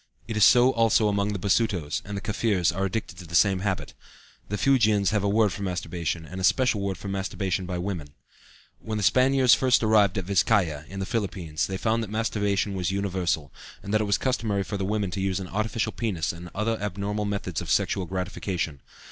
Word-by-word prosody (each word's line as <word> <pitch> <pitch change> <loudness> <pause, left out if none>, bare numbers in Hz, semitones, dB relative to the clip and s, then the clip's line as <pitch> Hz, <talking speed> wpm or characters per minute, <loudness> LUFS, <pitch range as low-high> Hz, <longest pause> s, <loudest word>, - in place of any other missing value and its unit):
It 115 - -4
is 110 - +3
so 125 +4 +7
also 115 -1 +3
among 100 0 0
the 105 - -2
Basutos, 95 -5 0
and 100 0 -6
the - - -4
Kaffirs 105 -4 +1
are 95 +1 -1
addicted 95 -2 -4
to 90 - -10
the 85 - -5
same 95 +2 +4
habit. 95 -1 -3 0.6
The 105 - -2
Fuegians 110 -7 +3
have 105 -2 0
a 100 - +1
word 105 -1 +3
for 100 - -7
masturbation, 85 -3 -3
and 90 +4 -7
a - - -4
special 125 0 +3
word 100 -2 -2
for 100 - -8
masturbation 95 -1 -2
by 90 -1 -3
women. 90 -4 -4 0.7
When 110 -1 -4
the 105 - -2
Spaniards 130 +2 +5
first 125 0 +3
arrived 105 -3 +4
at 95 - -2
Vizcaya, 95 -6 +1
in 95 +1 -7
the - - -2
Philippines, 95 -8 -2
they 95 - -3
found 115 +3 0
that 110 - -5
masturbation 105 -2 0
was 90 -2 -1
universal, 90 -7 -1 0.3
and 100 - -5
that 110 - +3
it - - 0
was 100 - +2
customary 110 -6 -1
for 100 - -5
the 95 -1 -2
women 100 -2 -1
to 95 - -3
use 95 0 0
an 95 -2 -7
artificial 110 +3 -1
penis 90 - -2
and 85 +1 -9
other 110 +2 -1
abnormal 105 +1 -2
methods 100 -6 -3
of - - -7
sexual 95 -2 +1
gratification. 90 -5 -3
100 Hz, 210 wpm, -26 LUFS, 90-110 Hz, 0.7 s, so